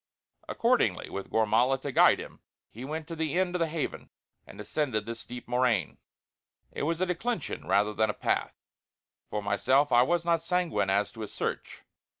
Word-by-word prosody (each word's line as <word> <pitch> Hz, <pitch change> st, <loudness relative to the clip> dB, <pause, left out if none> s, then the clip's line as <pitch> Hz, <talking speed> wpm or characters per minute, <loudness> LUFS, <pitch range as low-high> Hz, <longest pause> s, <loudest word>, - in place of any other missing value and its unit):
Accordingly, -, -, +1 dB
with 100 Hz, -, -5 dB
Gormala 115 Hz, +4 st, +2 dB
to 140 Hz, -, -3 dB
guide -, -, +6 dB
him, -, -, -9 dB, 0.3 s
he 120 Hz, -, -9 dB
went 155 Hz, +3 st, -5 dB
to 165 Hz, -, -6 dB
the 160 Hz, -1 st, -2 dB
end 185 Hz, -1 st, +1 dB
of 180 Hz, -, -1 dB
the 165 Hz, -, +2 dB
Haven 155 Hz, -2 st, -4 dB, 0.4 s
and -, -, -12 dB
descended 125 Hz, -9 st, -2 dB
the 115 Hz, -, -4 dB
steep 120 Hz, +1 st, -9 dB
moraine 120 Hz, -7 st, +1 dB, 0.7 s
it -, -, -5 dB
was 165 Hz, +4 st, -1 dB
a -, -, +3 dB
declension 215 Hz, +7 st, -3 dB
rather 105 Hz, +1 st, +2 dB
than 110 Hz, 0 st, +1 dB
a -, -, 0 dB
path. -, -, -1 dB, 0.7 s
For 105 Hz, -, -3 dB
myself 130 Hz, +8 st, +2 dB
I 120 Hz, -, +6 dB
was 170 Hz, +5 st, +1 dB
not 170 Hz, -1 st, +2 dB
sanguine 175 Hz, -, 0 dB
as 100 Hz, +1 st, +1 dB
to 115 Hz, -, -10 dB
a 105 Hz, -, -4 dB
search. -, -, -5 dB
130 Hz, 180 wpm, -29 LUFS, 110-165 Hz, 0.7 s, guide